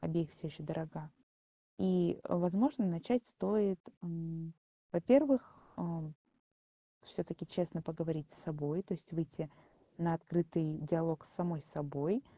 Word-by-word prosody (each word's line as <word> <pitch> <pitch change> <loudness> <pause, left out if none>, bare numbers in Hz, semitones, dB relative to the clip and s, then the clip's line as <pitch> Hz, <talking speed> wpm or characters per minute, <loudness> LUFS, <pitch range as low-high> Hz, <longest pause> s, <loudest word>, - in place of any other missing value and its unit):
обеих 165 -2 0
всё - - -8
еще 155 +1 -8
дорога. 155 0 -5 0.7
И, 180 -2 +3
возможно, 205 - +3
начать 235 +8 +1
стоит 200 -2 +2 0.2
м, 165 -1 -5 0.4
во-первых, 260 - +6 0.2
э, - - -3 1.2
всё-таки - - -5
честно 170 -2 -2
поговорить 160 -1 -3
с - - -10
собой, 150 +2 -1
то 195 - -4
есть 175 +4 -15
выйти 160 -1 -3 0.5
на 170 -1 +3
открытый 165 -2 0
диалог 165 0 +1
с - - -12
самой 175 -4 -1
собой. 150 - -1
165 Hz, 120 wpm, -36 LUFS, 160-185 Hz, 1.2 s, во-первых